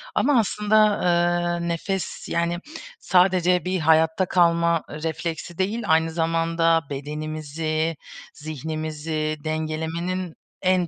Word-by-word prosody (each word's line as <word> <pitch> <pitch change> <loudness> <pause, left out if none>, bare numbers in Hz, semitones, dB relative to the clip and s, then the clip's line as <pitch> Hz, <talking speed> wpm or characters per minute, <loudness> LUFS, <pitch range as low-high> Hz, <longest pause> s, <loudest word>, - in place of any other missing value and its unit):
ama 275 -3 +4
aslında, 210 0 +1
ııı, 175 -3 +1
nefes, 190 +3 -3
yani 170 +1 0 0.4
sadece 180 -2 +3
bir 185 0 0
hayatta 160 +3 +3
kalma 170 -2 +3
refleksi 160 +2 -4
değil, 210 +5 -1
aynı 160 0 +3
zamanda 165 0 +2
bedenimizi, 155 +2 -3 0.4
zihnimizi 155 0 -4
dengelemenin 160 +3 -3 0.3
en 185 -2 +2
165 Hz, 95 wpm, -24 LUFS, 155-180 Hz, 0.4 s, ama